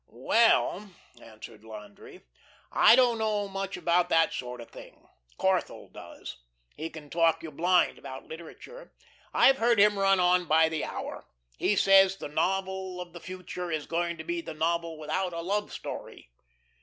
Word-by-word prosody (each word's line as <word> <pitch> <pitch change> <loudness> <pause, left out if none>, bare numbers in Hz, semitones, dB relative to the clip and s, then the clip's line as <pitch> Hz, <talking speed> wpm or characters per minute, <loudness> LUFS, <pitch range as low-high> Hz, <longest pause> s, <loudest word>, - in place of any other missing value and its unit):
"Well," 210 - +2 0.3
answered 110 -1 -13
Landry, 105 -2 -12 0.5
"I - - +6
don't 240 -3 +3
know 210 -2 -1
much 195 0 -5
about 175 +1 +1
that 165 0 +3
sort 125 -1 -6
of 115 - -11
thing. - - -14 0.3
Corthell - - -1
does. - - -10 0.4
He 160 +2 -5
can 150 -3 -12
talk 165 -1 +2
you 160 - -7
blind 175 +4 +2
about 130 0 -9
literature. 460 - -12 0.4
I've 270 0 +4
heard 235 0 +3
him 205 0 +4
run 195 -1 +3
on 180 0 +3
by 160 0 +4
the 160 -1 -3
hour. - - -7 0.3
He 210 - +1
says 195 0 +5
the - - -7
novel 190 +3 -2
of 180 -1 -8
the 175 - -9
future 180 -1 -7
is 155 -3 -3
going 170 0 -2
to - - -7
be 345 0 -3
the 160 - -8
novel 165 0 -1
without 180 +4 -3
a 170 - -4
love 205 +4 -2
story." - - -9
180 Hz, 165 wpm, -28 LUFS, 160-195 Hz, 0.5 s, I